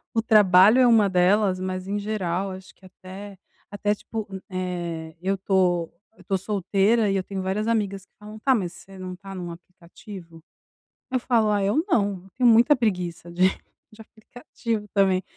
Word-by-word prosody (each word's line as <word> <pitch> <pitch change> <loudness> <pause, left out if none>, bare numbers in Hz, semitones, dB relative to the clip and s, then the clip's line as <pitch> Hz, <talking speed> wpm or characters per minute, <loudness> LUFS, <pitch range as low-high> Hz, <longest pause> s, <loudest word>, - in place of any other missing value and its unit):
o 225 - +3
trabalho 210 0 +6
é 255 - +6
uma 220 -4 +5
delas, 185 +1 +2
mas 185 0 -4
em 205 +1 -2
geral 195 -3 -2
acho 185 0 -11
que 190 - -21
até 190 +2 -11 0.3
até 205 0 -1
tipo, 220 +1 -6 0.2
eh, 175 -3 -4
eu 195 +1 0
estou 185 -3 0 0.2
eu - - -19
estou 195 - -1
solteira, 205 +2 +1
e - - 0
eu 185 - -1
tenho 195 0 -5
várias 200 +4 -2
amigas 200 -4 -1
que - - -54
falam: 210 +1 -11
"Tá, 265 +3 +3
mas 180 -6 -2
você 195 0 -14
não 185 -1 -7
está 195 +1 -10
num 175 -2 -6
aplicativo?" 170 0 -13 0.7
Eu 255 - +1
falo: 230 -3 +1
"Ah, 205 -1 +1
eu 235 +11 +1
não." 200 - +1
Eu - - -17
tenho 250 -1 +4
muita 235 +6 +6
preguiça 180 -7 -2
de 180 +2 -5 0.5
de 215 - -14
aplicativo 230 0 -6
também. 190 -2 +2
195 Hz, 180 wpm, -24 LUFS, 185-215 Hz, 0.7 s, trabalho